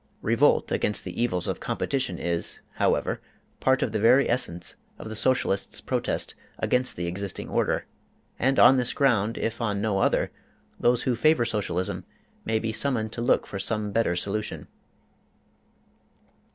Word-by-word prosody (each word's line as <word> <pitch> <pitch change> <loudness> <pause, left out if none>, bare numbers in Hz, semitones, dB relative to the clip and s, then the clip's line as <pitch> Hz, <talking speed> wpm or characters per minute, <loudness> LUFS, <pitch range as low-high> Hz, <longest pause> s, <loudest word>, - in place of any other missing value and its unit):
Revolt - - +3
against 105 - 0
the 90 +5 -5
evils 90 -8 0
of - - -2
competition 130 -10 -2
is, 85 0 -3 0.2
however, - - +1 0.4
part - - +3
of - - -1
the 110 - -1
very 130 +6 +5
essence 90 -8 -2 0.2
of - - -8
the 110 - -6
Socialist's 110 -4 0
protest - - -2 0.2
against 125 0 +1
the 85 - -2
existing 95 +3 -4
order, - - 0 0.5
and 135 +2 +2
on 135 - +8
this 125 -1 +1
ground, 115 -5 +2
if 115 +1 -2
on 105 -3 0
no 100 -2 0
other, - - +2 0.5
those 120 0 +3
who 125 -2 +1
favor 155 0 +3
Socialism 100 -3 -2 0.4
may 110 0 +1
be 110 0 -2
summoned 115 -4 0
to 115 - -5
look 120 - +2
for 100 - -6
some 105 +1 -2
better 100 -5 +1
solution. 100 +4 -3
110 Hz, 150 wpm, -26 LUFS, 100-120 Hz, 0.5 s, on